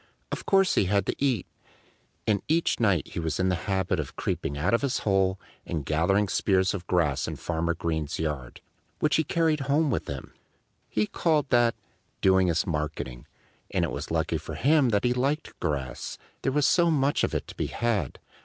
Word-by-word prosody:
Of - - -5
course 195 -2 +4
he - - +3
had 100 0 +1
to - - -2
eat. 125 -9 +1 0.8
And 105 -3 +2
each 165 +2 +1
night 100 - +2
he - - -5
was 80 0 -2
in 95 0 +2
the 90 - +2
habit 95 -2 +1
of 75 - -5
creeping 70 - -2
out 90 +9 +1
of 115 - +3
his 140 -3 0
hole 95 -2 +2 0.2
and 80 -5 -4
gathering 95 +7 +2
spears 95 -1 +2
of 90 -4 -6
grass 80 -6 +1
in - - -4
Farmer 85 0 -1
Green's 80 -3 -2
yard, 75 -6 -4 0.4
which 150 - +2
he 160 - +3
carried 160 0 +1
home 140 +2 +1
with - - -2
him. 70 -2 -6 0.6
He 105 - +1
called 150 +2 0
that 120 -1 +4 0.4
"doing 95 -1 +4
his 85 -1 +1
marketing." 75 -6 -4 0.4
And - - +1
it - - -4
was - - -5
lucky - - 0
for - - -7
him 145 -2 +4
that 105 -2 +1
he 125 - +3
liked 140 +5 -1
grass, 65 -4 -3 0.2
there 135 - 0
was 145 +1 +2
so 170 -1 +4
much 145 -2 +2
of - - 0
it - - -2
to - - -9
be - - -2
had. 110 - -1
95 Hz, 195 wpm, -27 LUFS, 80-135 Hz, 0.8 s, course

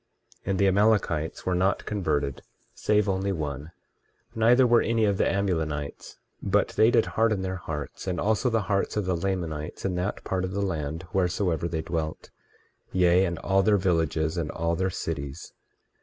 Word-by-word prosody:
23:14 - - -4
And 95 - +1
the 100 - +4
Amalekites 95 -5 +1
were 95 - +1
not 95 +2 +1
converted, 75 - -1 0.3
save 105 -1 +1
only 95 0 0
one; 75 -3 -4 0.6
neither 120 +3 +5
were 120 -1 +5
any 115 -1 +1
of 100 -2 +1
the - - +3
Amulonites; 80 -7 -2 0.2
but 100 +1 +2
they 110 - +4
did 115 -2 +3
harden 110 -3 +1
their 95 0 -3
hearts, 75 0 -6
and 90 -2 -1
also 110 +4 +1
the 115 -2 +1
hearts 100 +1 -1
of 105 - 0
the 90 -1 0
Lamanites 85 -5 -3
in 95 - 0
that 90 +3 -3
part 95 -1 -1
of 95 0 -3
the 100 +1 -1
land 80 -2 -3
wheresoever 90 -3 0
they 80 -1 -3
dwelt, 80 -2 -4 0.6
yea, 90 0 +4
and 85 -2 -2
all 95 +2 +2
their 105 +1 +4
villages 80 -3 0
and 80 -3 -2
all 85 0 -1
their 95 +2 0
cities. 75 -3 -5
95 Hz, 175 wpm, -26 LUFS, 80-100 Hz, 0.6 s, neither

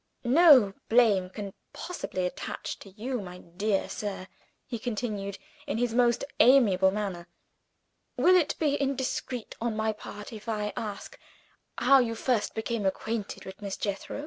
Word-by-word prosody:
"No 260 - +7 0.2
blame 215 -6 +4
can 200 0 -7 0.2
possibly 185 - -4
attach 180 - -5
to 195 - -12
you, 235 +5 -4
my 180 -2 -8
dear 195 +4 -2
sir," 200 -3 -5 0.4
he 235 -3 -5
continued, 210 -4 -3 0.3
in 285 - -1
his 240 -1 0
most 240 -1 +3 0.2
amiable 215 -8 +6
manner. 190 -4 -4 0.9
"Will 365 - +5
it 340 -5 +3
be 290 -2 +1
indiscreet, 265 -3 -2
on 230 -1 -1
my 220 0 0
part, 210 0 -9
if 215 +1 -8
I 210 -1 -2
ask 205 -3 -6 0.6
how 275 -1 +6
you 230 -2 0
first 230 -1 0
became 220 0 -2
acquainted 205 +2 -3
with 190 +2 -10
Miss 200 -1 -4
Jethro?" 200 +6 -4
220 Hz, 145 wpm, -28 LUFS, 200-245 Hz, 0.9 s, No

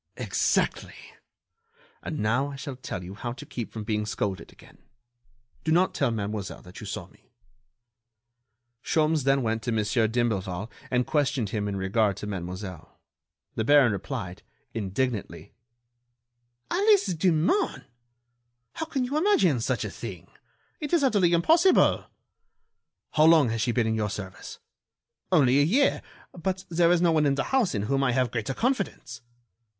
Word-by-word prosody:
"Exactly! - - 0 1.1
And 155 - -5
now 130 +5 +1
I 140 - -7
shall 140 0 -6
tell 110 -7 -6
you 90 +2 -8
how 120 +3 -5
to 125 - -10
keep 120 -3 -6
from 110 - -6
being 105 0 -2
scolded 100 -2 -3
again. - - -19 0.8
Do 160 - 0
not 180 +3 +3
tell 140 - +1
Mademoiselle 105 -3 -4
that 90 0 -12
you - - -8
saw - - -5
me." - - -26 1.5
Sholmes 155 -1 +1
then 135 -1 +3
went 110 0 -1
to 120 - -3
Mon. 110 -1 +1
d'Imblevalle 105 -3 -1 0.2
and 125 -1 +1
questioned 140 -7 0
him 105 -3 -2
in 100 - -3
regard 100 +1 +1
to - - -6
Mademoiselle. 90 -2 -7 0.5
The 110 - -1
baron 140 -1 +5
replied, 95 -1 -5 0.3
indignantly: 110 +1 -3 1.2
"Alice 400 - +3
Demun! 175 - +1 0.9
How 320 - -4
can 270 -4 -1
you 265 +4 -1
imagine 250 - +3
such - - -1
a - - -5
thing? - - -8 0.5
It 295 0 -5
is 335 -4 +4
utterly 205 -10 +3
impossible!" 325 - +4 1.1
"How 155 0 +4
long 160 -6 +6
has 115 0 -2
she 115 - +1
been 120 -1 +1
in 110 - 0
your 110 -1 -1
service?" 95 -2 -7 0.7
"Only 140 -6 +4
a - - +5
year, 245 - +2 0.3
but 185 +2 -3
there 170 0 +3
is 175 -1 +3
no 170 - +4
one 155 -2 +3
in 140 - +2
the 135 - 0
house 245 - +2
in 100 - -1
whom 135 +5 0
I 125 -2 +2
have 125 -2 +1
greater 120 +2 -3
confidence." 250 -4 -2
130 Hz, 155 wpm, -26 LUFS, 105-170 Hz, 1.5 s, long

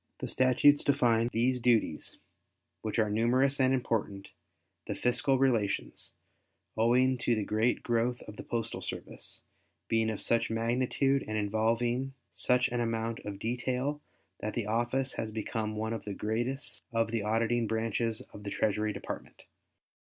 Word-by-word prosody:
The - - -4
statutes 130 +3 +4
define 120 -4 +3
these 125 +3 +1
duties 115 -2 +1 0.6
which 110 0 -3
are 110 -2 +2
numerous 130 +6 +2
and 130 -1 +4
important, 110 -6 -1 0.6
the - - -2
fiscal 125 +2 +2
relations, 120 -7 0 0.6
owing 125 +3 +3
to 120 -1 +2
the 110 - -1
great 110 +4 +1
growth 120 +1 0
of 105 - -10
the - - -7
postal 115 -1 -3
service, - - -5 0.4
being 115 -1 +2
of 110 - -3
such 115 0 +2
magnitude 125 +4 +1
and 110 0 -2
involving 115 +5 0 0.2
such 125 0 +3
an 120 - -2
amount 115 0 -1
of 100 -1 -6
detail 125 +6 -2 0.4
that 105 +1 -4
the 120 - -1
office 120 +5 0
has 110 - -4
become 110 0 -3
one 110 +1 -2
of 110 -3 -5
the 100 -2 -5
greatest 120 +7 -2
of 115 -1 +1
the 115 -2 0
auditing 115 +2 +1
branches 115 0 -1
of 105 - -9
the 100 - -5
Treasury 105 +1 0
Department. - - -7
115 Hz, 150 wpm, -30 LUFS, 110-125 Hz, 0.6 s, statutes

